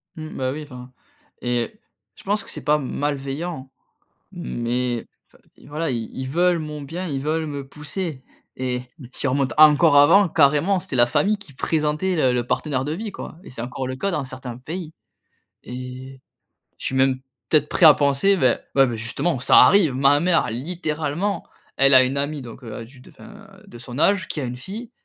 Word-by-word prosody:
Mmh, 155 Hz, -1 st, -8 dB
bah, 130 Hz, -1 st, -1 dB
oui, 150 Hz, +2 st, -5 dB
enfin 125 Hz, -3 st, -11 dB, 0.5 s
et 120 Hz, -, -1 dB, 0.4 s
je -, -, -15 dB
pense 205 Hz, +1 st, 0 dB
que -, -, -11 dB
c'est -, -, -7 dB
pas 150 Hz, 0 st, +3 dB
malveillant 140 Hz, +2 st, -4 dB, 0.6 s
mais 120 Hz, -, -2 dB
v -, -, -20 dB, 0.5 s
i -, -, -18 dB
voilà, 155 Hz, +1 st, -3 dB
ils 115 Hz, -2 st, -3 dB
ils 130 Hz, 0 st, -4 dB
veulent 175 Hz, +3 st, +2 dB
mon 150 Hz, -1 st, -6 dB
bien, 170 Hz, +6 st, -5 dB
ils 140 Hz, -4 st, -3 dB
veulent 155 Hz, +2 st, -1 dB
me 140 Hz, -2 st, -6 dB
pousser 150 Hz, 0 st, -5 dB, 0.3 s
et 125 Hz, -1 st, -2 dB, 0.3 s
si 140 Hz, -, -2 dB
on -, -, +1 dB
remonte 135 Hz, -1 st, 0 dB
encore 155 Hz, 0 st, +7 dB
avant, 170 Hz, +7 st, +6 dB
carrément, 155 Hz, +6 st, +3 dB
c'était 140 Hz, -, -6 dB
la 120 Hz, -1 st, +6 dB
famille 205 Hz, -, +1 dB
qui 175 Hz, -9 st, -10 dB
présentait 155 Hz, +6 st, 0 dB
le 130 Hz, -5 st, +2 dB
le 120 Hz, -1 st, -1 dB
partenaire 135 Hz, 0 st, -1 dB
de 150 Hz, -, -2 dB
vie, 215 Hz, +4 st, -5 dB
quoi 160 Hz, -, -9 dB
et -, -, -12 dB
c'est 120 Hz, -, -7 dB
encore 125 Hz, +2 st, -4 dB
le 130 Hz, -, -4 dB
cas 195 Hz, +9 st, -1 dB
dans 150 Hz, -5 st, -1 dB
certains 130 Hz, -2 st, -8 dB
pays. 160 Hz, +5 st, -7 dB, 0.7 s
Et 130 Hz, +1 st, -8 dB, 0.6 s
je -, -, -11 dB
suis -, -, -2 dB
même, 130 Hz, 0 st, +2 dB, 0.3 s
peut-être, 155 Hz, -, +3 dB
prêt 180 Hz, -, +2 dB
à 155 Hz, -, +11 dB
penser, 145 Hz, +8 st, +2 dB
beh, 130 Hz, -5 st, +3 dB, 0.2 s
ouais, 135 Hz, -1 st, +5 dB
beh, 120 Hz, -2 st, -3 dB
justement, 115 Hz, +7 st, -1 dB
ça 130 Hz, -, +5 dB
arrive, 160 Hz, 0 st, +6 dB
ma 140 Hz, +2 st, +4 dB
mère, 170 Hz, -8 st, +2 dB
littéralement, 160 Hz, -, -3 dB, 0.3 s
elle 135 Hz, 0 st, +4 dB
a 130 Hz, -, +9 dB
une 130 Hz, +2 st, -1 dB
amie 145 Hz, +1 st, -2 dB
donc, 120 Hz, +2 st, -11 dB
heu, 115 Hz, +1 st, -7 dB
du 125 Hz, +2 st, -17 dB
d -, -, -16 dB
enfin 215 Hz, -1 st, -14 dB, 0.2 s
de 120 Hz, -, -12 dB
son 120 Hz, +2 st, -8 dB
âge, 190 Hz, +3 st, +3 dB
qui 150 Hz, -, -4 dB
a -, -, -3 dB
une 125 Hz, 0 st, -4 dB
fille 215 Hz, -, -8 dB
145 Hz, 200 wpm, -22 LUFS, 130-165 Hz, 0.7 s, à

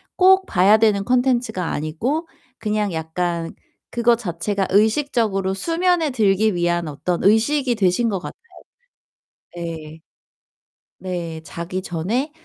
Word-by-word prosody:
꼭 380 Hz, 0 st, +5 dB
봐야 195 Hz, -, +4 dB
되는 210 Hz, -3 st, +2 dB
콘텐츠가 245 Hz, -5 st, +1 dB
아니고 225 Hz, -, -2 dB, 0.3 s
그냥 210 Hz, -3 st, -1 dB
약간 165 Hz, +1 st, -3 dB, 0.4 s
그거 235 Hz, 0 st, +3 dB
자체가 195 Hz, -2 st, -2 dB
의식적으로 215 Hz, -3 st, +1 dB
수면에 335 Hz, -, +1 dB
들기 215 Hz, -3 st, +2 dB
위한 175 Hz, -1 st, 0 dB
어떤 170 Hz, +4 st, -3 dB
의식이 240 Hz, +6 st, +3 dB
되신 200 Hz, +3 st, +2 dB
것 195 Hz, -3 st, -2 dB
같아요. -, -, -8 dB, 1.2 s
네. 160 Hz, -2 st, -7 dB, 1.0 s
네. 170 Hz, -3 st, -5 dB
자기 170 Hz, +3 st, -5 dB
전에 200 Hz, -, -2 dB
200 Hz, 240 characters per minute, -21 LUFS, 175-240 Hz, 1.2 s, 꼭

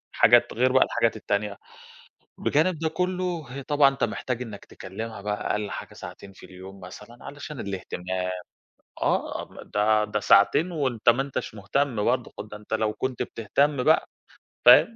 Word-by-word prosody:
حاجات 120 Hz, +1 st, +5 dB
غير 130 Hz, +3 st, +2 dB
بقى 130 Hz, 0 st, +6 dB
الحاجات 115 Hz, -, +1 dB
التانية، 105 Hz, -1 st, -2 dB, 0.8 s
بجانب 160 Hz, +3 st, +2 dB
ده 160 Hz, 0 st, 0 dB
كلّه 180 Hz, -1 st, -2 dB, 0.2 s
طبعًا 145 Hz, -1 st, +5 dB
أنت 135 Hz, -, -1 dB
محتاج 125 Hz, -1 st, -3 dB
إنك 105 Hz, -5 st, -8 dB
تكلمها 105 Hz, +3 st, -7 dB
بقى 105 Hz, 0 st, -3 dB
أقل 105 Hz, -1 st, -1 dB
حاجة -, -, -7 dB
ساعتين 100 Hz, -, -10 dB
في 95 Hz, -, -14 dB
اليوم 95 Hz, +1 st, -12 dB
مثلًا 105 Hz, +6 st, -11 dB
علشان 145 Hz, -1 st, -8 dB
الاهتمام، 95 Hz, -1 st, -4 dB, 0.7 s
آه -, -, 0 dB, 0.2 s
ده 105 Hz, +1 st, +2 dB
ده 105 Hz, 0 st, -2 dB
ساعتين 145 Hz, -, +4 dB
وأنت 130 Hz, -8 st, -1 dB
ما 120 Hz, +3 st, +5 dB
أنتش 135 Hz, -5 st, -5 dB
مهتم 110 Hz, +3 st, -1 dB
برضو، 125 Hz, 0 st, 0 dB
خ -, -, -3 dB
ده 105 Hz, 0 st, -10 dB
أنت 105 Hz, +1 st, -6 dB
لو 110 Hz, -1 st, +1 dB
كنت 130 Hz, +2 st, -3 dB
بتهتم 130 Hz, +5 st, 0 dB
بقى، -, -, +4 dB, 0.6 s
فاهم؟ 125 Hz, -, +8 dB
115 Hz, 155 wpm, -26 LUFS, 105-140 Hz, 0.8 s, فاهم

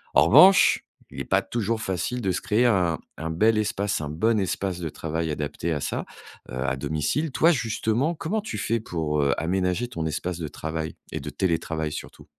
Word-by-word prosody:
En 70 Hz, -, +7 dB
revanche, 165 Hz, -, +7 dB, 0.3 s
il -, -, -8 dB
est -, -, -3 dB
pas -, -, +2 dB
toujours 115 Hz, -1 st, -1 dB
facile 95 Hz, +5 st, -2 dB
de 95 Hz, -4 st, 0 dB
se -, -, -2 dB
créer 110 Hz, +3 st, +2 dB
un 90 Hz, -8 st, +3 dB, 0.2 s
un 80 Hz, +1 st, -4 dB
bel 110 Hz, +8 st, +3 dB
espace 105 Hz, -4 st, -1 dB
un 75 Hz, -, -4 dB
bon 110 Hz, +8 st, +1 dB
espace 95 Hz, -1 st, -2 dB
de 85 Hz, -3 st, -3 dB
travail 80 Hz, +1 st, -3 dB
adapté 75 Hz, +2 st, -3 dB
à 75 Hz, -, 0 dB
ça, -, -, -3 dB, 0.4 s
heu, 65 Hz, -, -6 dB
à 65 Hz, -, 0 dB
domicile. 80 Hz, -, -1 dB
Toi 165 Hz, +6 st, +4 dB
justement, 120 Hz, +3 st, 0 dB
comment 200 Hz, +8 st, -2 dB
tu 215 Hz, -, -5 dB
fais 115 Hz, -, 0 dB
pour, 80 Hz, -7 st, -1 dB
heu, 70 Hz, -1 st, +3 dB
aménager 90 Hz, +6 st, 0 dB
ton 80 Hz, -9 st, -3 dB
espace 85 Hz, +3 st, -3 dB
de 80 Hz, -, -3 dB
travail 80 Hz, +2 st, -5 dB, 0.2 s
et -, -, -3 dB
de 70 Hz, -, -6 dB
télétravail 80 Hz, -1 st, -1 dB
surtout? -, -, -8 dB
90 Hz, 200 wpm, -25 LUFS, 80-115 Hz, 0.4 s, En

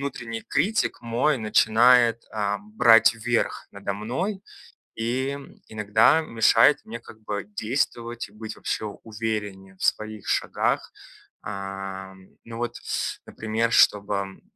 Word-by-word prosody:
внутренний 120 Hz, -5 st, -5 dB
критик 205 Hz, +10 st, 0 dB
мой 120 Hz, +5 st, +1 dB
начинает, 115 Hz, +2 st, +4 dB
а, 105 Hz, -1 st, -1 dB
брать 115 Hz, -, +5 dB
верх 120 Hz, +1 st, -1 dB
надо 100 Hz, 0 st, -4 dB
мной 160 Hz, -, -3 dB, 0.6 s
и 130 Hz, +5 st, -2 dB, 0.3 s
иногда 110 Hz, +7 st, +3 dB
мешает 115 Hz, 0 st, +4 dB
мне 115 Hz, +2 st, -7 dB
как 110 Hz, -1 st, -15 dB
бы 105 Hz, -2 st, -4 dB
действовать 115 Hz, +1 st, -3 dB
и -, -, -22 dB
быть 110 Hz, +1 st, -8 dB
вообще -, -, -3 dB
увереннее 105 Hz, -3 st, -5 dB
в -, -, -8 dB
своих 110 Hz, -1 st, -1 dB
шагах. -, -, 0 dB, 0.5 s
А, 95 Hz, -1 st, -6 dB, 0.3 s
ну 115 Hz, 0 st, -8 dB
вот, 120 Hz, 0 st, -3 dB
с -, -, -3 dB
например, 110 Hz, +1 st, -2 dB
чтобы 100 Hz, -3 st, +2 dB
115 Hz, 120 wpm, -25 LUFS, 105-120 Hz, 0.6 s, брать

